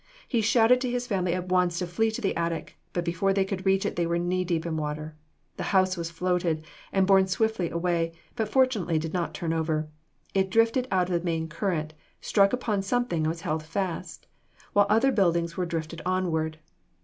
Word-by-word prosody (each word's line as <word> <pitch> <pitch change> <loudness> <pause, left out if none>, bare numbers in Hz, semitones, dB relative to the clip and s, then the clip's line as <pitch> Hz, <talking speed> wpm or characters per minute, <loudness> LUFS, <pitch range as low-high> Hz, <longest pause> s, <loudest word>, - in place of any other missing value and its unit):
He 235 -4 +1
shouted 230 +3 +4
to 255 - -1
his 245 0 -1
family 185 -5 0
at 185 0 -4
once 180 -2 +2
to 180 - -1
flee 220 +6 +1
to 220 +3 -4
the 195 - 0
attic, 170 -1 -3 0.2
but, 175 -1 -2
before 175 +3 +1
they 195 -1 +2
could 190 -1 -4
reach 195 0 +3
it - - -2
they 170 -1 +1
were 170 0 +1
knee 180 +1 0
deep 170 -2 -1
in 165 -1 -2
water. 155 0 -4 0.4
The - - -3
house 185 0 +3
was 170 -2 -4
floated, 170 -2 -1 0.3
and 195 -1 +3
borne 190 0 +5
swiftly 205 -2 0
away, 170 0 0 0.2
but 220 -2 -1
fortunately 220 -10 +2
did 160 0 -3
not 175 -2 -2
turn 165 -1 -2
over. 155 -1 -1 0.4
It 190 -1 +2
drifted 230 +5 +2
out 185 -1 +1
of 170 -1 +1
the - - -13
main 165 -1 -1
current, 160 -2 -2 0.3
struck 200 -1 +3
upon 230 -5 0
something, 240 -3 0
and 155 - +1
was 165 +1 -3
held 160 -2 -1
fast, 180 +2 -4 0.5
while 205 0 +5
other 225 +6 +4
buildings 170 -5 +1
were 180 -1 -1
drifted 165 0 -4
onward. 165 -4 0
180 Hz, 205 wpm, -27 LUFS, 165-200 Hz, 0.5 s, borne